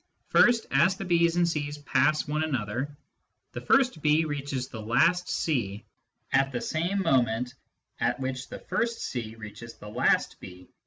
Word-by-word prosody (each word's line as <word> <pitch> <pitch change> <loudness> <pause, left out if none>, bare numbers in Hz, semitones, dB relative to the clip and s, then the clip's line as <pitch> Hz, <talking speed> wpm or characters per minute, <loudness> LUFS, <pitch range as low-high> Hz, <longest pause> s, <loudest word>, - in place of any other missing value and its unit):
First, 235 -2 +5
as 185 +2 +3
the 195 - -5
B's 170 -1 +3
and 175 -1 +3
C's 150 -3 -2
pass 150 +2 +1
one 150 +2 0
another, 130 0 -3 0.5
the - - -6
first 255 - +2
B 155 +2 +3
reaches 140 -3 -3
the 110 -4 -8
last 170 +11 +2
C 110 -10 -1 0.5
at 135 0 +3
the 120 - -2
same 175 +8 -1
moment 125 -5 +1 0.5
at - - 0
which 130 0 -4
the - - -7
first 235 0 -2
C 115 -3 -4
reaches 115 +1 -10
the 105 -1 -11
last 105 - +1
B. 90 0 -12
145 Hz, 160 wpm, -27 LUFS, 120-170 Hz, 0.5 s, First